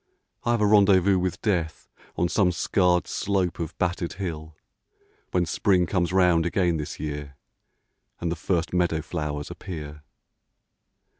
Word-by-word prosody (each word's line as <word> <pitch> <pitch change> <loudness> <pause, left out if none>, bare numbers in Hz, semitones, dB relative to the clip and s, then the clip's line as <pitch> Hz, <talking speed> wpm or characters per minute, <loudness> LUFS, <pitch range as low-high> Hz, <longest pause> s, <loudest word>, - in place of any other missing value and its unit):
I 120 - -1
have 120 -2 +2
a - - +4
rendezvous 100 -2 +5
with 90 +2 -3
Death 85 -7 -1 0.3
On 85 - +1
some 90 0 +2
scarred 90 +1 +2
slope 95 -4 -1
of 85 -1 -5
battered 90 -1 -1
hill, 80 -5 -6 0.7
When 90 -1 +1
Spring 90 +2 +2
comes 90 -1 0
round 90 -3 +4
again 85 -1 +1
this 75 -1 -6
year 75 -2 -5 0.8
And 85 -1 -2
the - - -1
first 85 +1 -1
meadow 85 -3 +1
flowers 75 -3 -4
appear. 75 -5 -8
90 Hz, 140 wpm, -25 LUFS, 80-95 Hz, 0.8 s, rendezvous